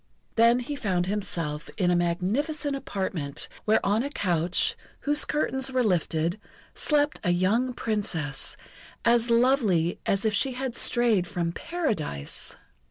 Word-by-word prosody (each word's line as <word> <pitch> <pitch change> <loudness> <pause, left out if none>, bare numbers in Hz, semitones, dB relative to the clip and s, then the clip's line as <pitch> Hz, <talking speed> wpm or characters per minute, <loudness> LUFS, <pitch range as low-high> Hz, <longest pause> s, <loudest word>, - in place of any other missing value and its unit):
Then 235 +2 +4
he 290 +4 -4
found 185 -9 0
himself 175 -7 -3
in 180 -4 +2
a - - +3
magnificent 235 - 0
apartment 180 - -3 0.2
where 220 +1 +4
on 210 +3 +2
a 280 - -2
couch, 175 - +1 0.3
whose 295 +1 +2
curtains 265 -3 0
were 255 -1 +2
lifted, 170 -2 0 0.3
slept 295 0 +1
a - - +1
young 200 +9 +2
Princess 185 - -2 0.5
as 235 0 +4
lovely 230 - +3
as 195 +2 +1
if 215 - +2
she 260 +5 +2
had 255 -1 -4
strayed 230 -7 +3
from 170 -1 -2
Paradise! 185 - -3
210 Hz, 135 wpm, -27 LUFS, 175-255 Hz, 0.5 s, Then